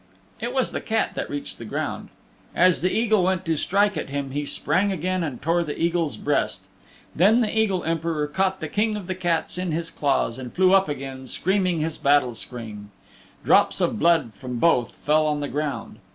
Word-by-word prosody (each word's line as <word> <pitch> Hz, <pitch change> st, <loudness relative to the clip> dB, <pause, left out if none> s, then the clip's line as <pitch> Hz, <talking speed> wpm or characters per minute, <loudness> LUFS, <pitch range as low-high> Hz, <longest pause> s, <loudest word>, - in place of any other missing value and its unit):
It 240 Hz, -, -3 dB
was 260 Hz, -1 st, 0 dB
the -, -, -3 dB
Cat 220 Hz, 0 st, 0 dB
that -, -, -4 dB
reached 145 Hz, 0 st, -5 dB
the -, -, -7 dB
ground. 110 Hz, -, -4 dB, 0.5 s
As 180 Hz, 0 st, +4 dB
the 185 Hz, +2 st, +1 dB
Eagle 220 Hz, -3 st, +2 dB
went 185 Hz, 0 st, 0 dB
to 165 Hz, -1 st, +1 dB
strike 200 Hz, +6 st, +1 dB
at -, -, -4 dB
him 140 Hz, -1 st, -3 dB
he 145 Hz, +2 st, -2 dB
sprang 185 Hz, +8 st, +1 dB
again 185 Hz, 0 st, -1 dB
and 140 Hz, -7 st, -4 dB
tore 170 Hz, +3 st, +1 dB
the 150 Hz, -3 st, -5 dB
Eagle's 165 Hz, -7 st, 0 dB
breast. -, -, -1 dB, 0.5 s
Then 210 Hz, +8 st, +5 dB
the 220 Hz, -1 st, -1 dB
Eagle 200 Hz, -5 st, +1 dB
Emperor 165 Hz, -2 st, -1 dB
caught 190 Hz, +5 st, -1 dB
the 160 Hz, -, -3 dB
King 210 Hz, +6 st, 0 dB
of 205 Hz, -3 st, -5 dB
the 185 Hz, -, -2 dB
Cats 175 Hz, -1 st, -1 dB
in 180 Hz, -2 st, -2 dB
his 165 Hz, +1 st, -3 dB
claws 135 Hz, -5 st, 0 dB
and 125 Hz, -2 st, -7 dB
flew 185 Hz, 0 st, +4 dB
up 195 Hz, -2 st, +4 dB
again, 135 Hz, -2 st, -6 dB
screaming 185 Hz, +2 st, 0 dB
his 160 Hz, 0 st, -3 dB
battle 140 Hz, -3 st, +3 dB
scream. 110 Hz, -3 st, -6 dB, 0.6 s
Drops -, -, +4 dB
of -, -, 0 dB
blood 165 Hz, -9 st, +3 dB
from 125 Hz, +4 st, -6 dB
both 125 Hz, -4 st, +2 dB
fell 155 Hz, +1 st, +3 dB
on 150 Hz, -1 st, 0 dB
the 145 Hz, -, -2 dB
ground. 145 Hz, -5 st, -4 dB
165 Hz, 200 wpm, -24 LUFS, 145-185 Hz, 0.6 s, Then